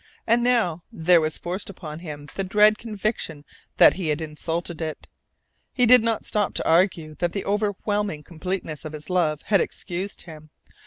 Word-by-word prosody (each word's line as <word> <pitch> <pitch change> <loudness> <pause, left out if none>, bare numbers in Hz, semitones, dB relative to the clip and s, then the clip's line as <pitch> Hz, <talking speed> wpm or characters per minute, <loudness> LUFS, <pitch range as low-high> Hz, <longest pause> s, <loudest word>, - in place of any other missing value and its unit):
And 235 +1 +3
now 225 -10 +2
there 170 +1 +4
was 155 0 -1
forced 185 +4 -4
upon 160 -5 -8
him 150 -4 -8
the 195 - -2
dread 210 +2 +4
conviction 210 -9 -3 0.3
that - - +8
he 185 -4 -4
had 150 0 0
insulted 160 +2 -4
it. 155 -1 -5 0.7
He 250 - +3
did 250 +1 +8
not 225 -2 -1
stop 210 -2 -1
to - - -1
argue 165 -2 +2
that 175 -1 0
the 200 - -3
overwhelming 205 -4 -1
completeness 170 -3 -5
of 155 - -7
his 155 +4 -8
love 155 -5 +1
had 200 -2 +3
excused 185 +2 -5
him. 155 -2 -12
180 Hz, 170 wpm, -24 LUFS, 155-205 Hz, 0.7 s, that